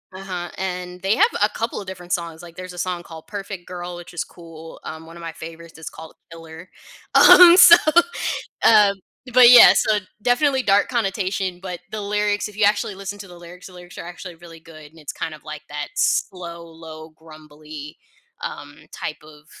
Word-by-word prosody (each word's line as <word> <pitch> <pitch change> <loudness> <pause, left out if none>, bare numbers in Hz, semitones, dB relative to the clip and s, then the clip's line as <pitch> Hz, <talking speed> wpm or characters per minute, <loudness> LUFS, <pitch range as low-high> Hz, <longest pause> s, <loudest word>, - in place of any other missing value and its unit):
uh-huh, 185 -2 -6
and 180 -1 -5
they 195 +2 +1
have 440 - +4
a - - +3
couple 230 -1 -4
of 195 - -12
different 180 -1 -7
songs, 170 -1 -4
like, 170 -1 -13
there's 185 0 -9
a - - -13
song 180 -1 -3
called 160 -2 -12
Perfect 195 -3 -8
Girl, 175 -1 -7
which 175 0 -12
is 175 - -3
cool, 165 -1 -14
um, 160 +1 -9
one 165 +1 -13
of - - -12
my 165 -1 -6
favorites 165 +1 -12
is 160 - -8
called 160 0 -13 0.2
Killer. 165 +2 -12 0.5
Um, 355 -1 +9
so, 355 -2 +10 0.9
um, 210 -3 +6 0.4
but 250 -1 +8
yeah, 245 -1 +10
so, 215 -1 +2 0.2
definitely 265 +3 +1
dark 200 -1 +3
connotation, 195 -5 -2
but 180 -2 -6
the 215 - -5
lyrics, 205 0 -1
if 210 - -14
you 215 - 0
actually 205 0 0
listen 195 +1 -7
to 200 - -10
the 175 - -14
lyrics, 175 +1 -13
the 185 - -15
lyrics 180 0 -14
are - - -8
actually 175 0 -10
really 165 0 -14
good, 155 -2 -15
and 165 - -18
it's 150 - -8
kind 160 - -5
of 155 - -14
like 155 -1 -9
that 150 0 -5
slow, 170 - -2
low, 160 -1 -12
grumbly, 155 -1 -13 0.5
um, 70 - -8
type - - -7
of 150 -1 -17
175 Hz, 195 wpm, -21 LUFS, 160-195 Hz, 0.9 s, so